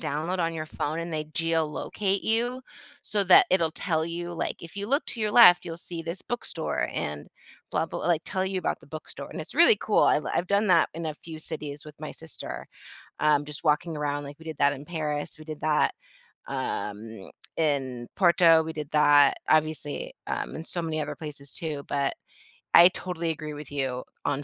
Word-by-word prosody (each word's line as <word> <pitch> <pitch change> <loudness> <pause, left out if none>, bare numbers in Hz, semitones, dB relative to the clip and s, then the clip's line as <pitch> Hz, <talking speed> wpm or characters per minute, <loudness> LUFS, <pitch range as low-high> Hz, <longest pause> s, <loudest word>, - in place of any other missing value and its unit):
download 160 +6 -2
on 165 -1 0
your 155 -1 -3
phone 155 +1 -3
and 170 0 -4
they 155 -1 -2
geolocate 165 +5 -1
you, 240 +3 0 0.4
so 205 -1 0
that 185 - +8
it'll 170 -4 +3
tell 160 -1 0
you, 175 +1 -4
like, 170 - -2
if 170 +3 -11
you 200 0 -3
look 280 +7 +1
to 235 - -3
your 215 -1 +1
left, 180 -7 +8
you'll 165 -2 -5
see 170 -1 -7
this 165 +3 -5
bookstore 205 -9 -2
and 75 0 -4 0.4
blah, - - 0
blah, - - -5
like, 170 -2 +2
tell 190 -1 -1
you 190 0 -1
about - - -2
the - - -17
bookstore, 155 +1 -8
and - - -6
it's - - -9
really - - +7
cool. - - +2
I - - +5
l - - -3
I've 175 - 0
done 200 +1 +3
that 170 -3 +5
in 165 0 -4
a 155 - -3
few 160 +1 -10
cities 150 -2 -6
with 150 -1 -11
my 155 - -5
sister, 160 -1 -8 0.5
um, 150 -1 +3
just 150 -1 -7
walking 155 +1 +1
around, 145 -1 -2
like, 145 +2 -9
we 160 - -14
did 160 -2 -7
that 140 0 +4
in 145 0 -7
Paris, 150 -3 -3
we 155 - -11
did 155 -1 -7
that, 155 -1 +2 0.5
um, 105 0 -4 0.3
in 135 -6 0
Porto, 170 -3 +6
we 160 - -5
did 150 -2 -5
that, 145 -2 +5
obviously, 155 -1 +1
um, - - -3
in 160 - -6
so 175 - -3
many 155 -1 -2
other 150 - -4
places 145 -3 -7
too, 150 -4 -4
but 140 -1 0 0.6
I 175 +1 +10
totally 175 -2 -4
agree 155 -1 -6
with 145 -1 -9
you 130 -3 -2 0.2
on 145 0 0
160 Hz, 205 wpm, -27 LUFS, 145-175 Hz, 0.6 s, I